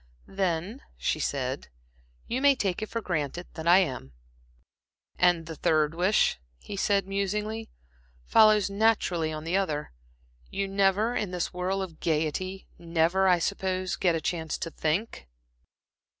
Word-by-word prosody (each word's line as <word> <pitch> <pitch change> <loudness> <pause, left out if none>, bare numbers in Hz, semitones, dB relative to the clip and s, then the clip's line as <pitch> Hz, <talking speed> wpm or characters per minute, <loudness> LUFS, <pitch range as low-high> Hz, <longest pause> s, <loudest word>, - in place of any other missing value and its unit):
"Then," 190 - -2 0.2
she 155 - -1
said 135 -2 -2 0.6
"you 250 +3 -2
may 280 0 +6
take 195 -6 -1
it 215 - -4
for 230 - -3
granted 175 -2 -3
that 160 0 -6
I 175 +2 +8
am." 130 - -1 1.1
"And 175 -2 +3
the 160 0 -7
third 155 0 +2
wish," 180 - +2 0.2
he 200 - -8
said, 195 -1 +1
musingly, 210 +3 -2 0.6
"follows 215 - +5
naturally 200 -6 +1
on 155 0 -5
the 170 +4 0
other. 155 -7 -2 0.6
You 195 0 -2
never, 200 +4 +2
in 210 - -1
this 180 -1 -3
whirl 185 +2 -1
of 170 -4 -9
gaiety 165 +4 -2
never, 170 +3 +2
I 180 -1 +5
suppose, 185 0 -1
get 175 -3 +2
a 160 - -2
chance 160 0 -2
to 165 - -5
think?" 160 - -2
185 Hz, 145 wpm, -27 LUFS, 160-200 Hz, 1.1 s, I